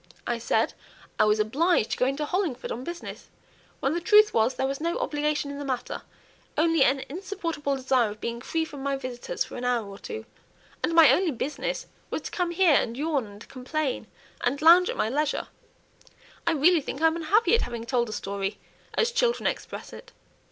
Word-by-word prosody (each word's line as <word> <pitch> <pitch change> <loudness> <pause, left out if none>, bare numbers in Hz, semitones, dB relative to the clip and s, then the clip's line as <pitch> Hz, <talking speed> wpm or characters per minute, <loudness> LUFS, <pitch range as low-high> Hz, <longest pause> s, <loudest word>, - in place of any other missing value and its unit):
I 240 -1 -1
said 235 - +1 0.5
I - - +6
'was 210 0 +3
obliged 265 +4 +2
to - - -1
go 250 - +2
into 275 +3 -1
Hollingford 330 -7 -2
on 245 - -4
business,' 345 +4 -7 0.5
when 270 - +1
the 345 - -1
truth 425 +3 +6
was 230 +3 +2
there 265 - 0
was 275 +2 -3
no 335 +1 0
obligation 295 -1 -1
in 285 - -6
the - - -4
matter, 260 -3 -3 0.6
only 325 -2 +4
an 265 +1 +2
insupportable 335 -4 -3
desire 255 -3 +2
of 210 +1 -9
being 235 +1 -4
free 320 +5 -1
from 290 -4 -9
my 275 0 0
visitors 255 - -4
for - - -9
an 245 - -5
hour 245 -3 +1
or 200 0 -10
two, 445 - -7 0.6
and 330 - 0
my 325 -2 +8
only 365 -1 +3
business 270 0 -3 0.2
was - - -3
to - - -6
come 360 -3 -1
here, 345 -1 +4
and 235 -3 +1
yawn, 290 -5 0
and 205 +1 -13
complain, 260 -2 -3 0.4
and 260 +3 +1
lounge 350 +3 +7
at - - -3
my - - +1
leisure. 290 +5 -1 1.0
I 335 - +4
really 320 +3 +4
think 270 - -5
I'm 320 0 +3
unhappy 365 +9 +2
at 465 - +5
having 235 -1 -4
told 240 -2 0
a - - -5
story, 200 -1 -3 0.4
as 465 +1 +2
children 480 0 +1
express - - -3
it." - - -12
285 Hz, 200 wpm, -26 LUFS, 245-335 Hz, 1.0 s, my